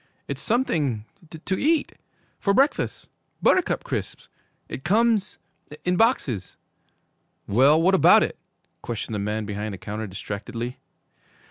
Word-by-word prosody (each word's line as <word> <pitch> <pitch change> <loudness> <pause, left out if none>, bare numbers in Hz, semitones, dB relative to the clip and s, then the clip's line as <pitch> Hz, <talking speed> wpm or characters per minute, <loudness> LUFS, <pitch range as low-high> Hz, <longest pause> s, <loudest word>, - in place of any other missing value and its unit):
'It's - - -4
something 150 - 0 0.2
to 170 +4 -4
eat! 310 +1 +2 0.5
For 200 -2 +1
breakfast! 275 +3 +1 0.3
Buttercup 370 - +2
Crisps! - - -5 0.4
It 135 - -7
comes 215 +3 +2 0.5
in 180 0 +2
boxes.' 145 - +1 0.9
'Well, 135 +9 +5
what 180 +4 +3
about 190 - +7
it?' - - -4 0.4
questioned 115 -1 -5
the 105 - -2
man 105 +2 -2
behind 105 0 -4
the - - -10
counter 105 +3 -5
distractedly. 115 +6 -6
140 Hz, 120 wpm, -24 LUFS, -, 0.9 s, about